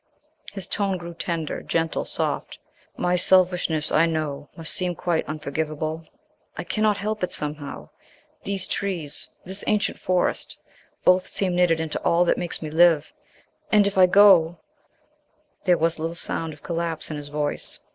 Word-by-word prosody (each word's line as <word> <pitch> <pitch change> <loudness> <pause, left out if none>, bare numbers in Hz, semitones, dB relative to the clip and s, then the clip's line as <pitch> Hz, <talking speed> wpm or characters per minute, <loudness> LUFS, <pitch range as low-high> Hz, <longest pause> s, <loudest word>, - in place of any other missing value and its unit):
His 195 -2 -5
tone 200 -2 -1
grew 170 -1 -8
tender, 165 -2 -3
gentle, 165 -1 -1
soft. - - -2 0.4
"My 180 0 +1
selfishness, 180 -3 +3
I 165 +2 +4
know, 150 -3 -3
must 165 -2 -2
seem 180 -1 -1
quite 170 -1 -1
unforgivable. 155 +1 -4 0.5
I - - -3
cannot 215 -1 +1
help 215 0 -3
it 180 - -1
somehow; 150 -1 -6 0.5
these 195 -2 -2
trees, 175 -7 -3 0.2
this 190 +2 -3
ancient 210 -1 0
Forest, 180 -1 -1 0.5
both 185 0 +4
seem 185 -2 0
knitted 175 -2 +3
into 160 -1 -3
all 170 +1 +3
that - - +1
makes 175 -1 -1
me 155 - -5
live, 160 -2 +4 0.6
and 210 -1 +5
if 200 - -1
I 185 -1 +6
go 180 -3 +6 0.5
" 300 0 -42
There 180 -2 +4
was 165 0 +3
a - - -6
little 165 +1 -3
sound 165 -1 -2
of 150 - -17
collapse 170 -2 -3
in 150 - -4
his 145 -1 -6
voice. 145 0 -3
170 Hz, 160 wpm, -24 LUFS, 155-185 Hz, 0.6 s, I